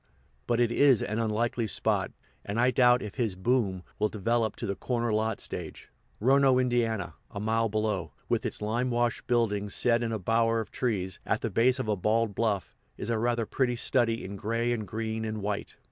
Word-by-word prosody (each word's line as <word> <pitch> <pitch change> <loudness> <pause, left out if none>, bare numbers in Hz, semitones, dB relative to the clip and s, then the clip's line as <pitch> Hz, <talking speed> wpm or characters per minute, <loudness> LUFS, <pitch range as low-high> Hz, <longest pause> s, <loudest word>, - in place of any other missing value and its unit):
But 120 - +1
it 120 -1 +3
is 135 -2 +4
an 110 +2 -2
unlikely 115 +1 0
spot, - - 0 0.3
and 105 +3 -3
I 125 +2 +4
doubt 125 -1 +4
if 105 -2 -6
his 110 -6 0
"boom" 95 -3 0 0.2
will 105 - +3
develop 110 +1 0
to - - -5
the 100 -2 -2
corner 120 -1 -1
lot 110 0 0
stage. - - -5 0.3
Rono, 135 +2 +4
Ind., 125 -1 +1
a 110 -4 -2
mile 115 +2 +1
below, 105 -6 -1 0.2
with - - 0
its - - -3
limewashed 120 +2 0
buildings 105 -5 +1
set 120 -1 +2
in 115 -1 -1
a 110 - -1
bower 115 +3 +2
of 110 - -5
trees, 95 -7 -2
at - - -1
the - - -2
base 125 +3 +3
of 130 - -3
a 105 - +1
bald 110 +3 +1
bluff, 105 -3 -1 0.2
is 115 - -3
a 115 - 0
rather 120 0 0
pretty 125 +2 0
study 120 -2 +1
in 100 +1 -6
gray 115 +4 0
and 110 -3 -4
green 110 +2 -3
and 110 -2 -4
white. 100 0 -3
115 Hz, 195 wpm, -28 LUFS, 105-120 Hz, 0.3 s, is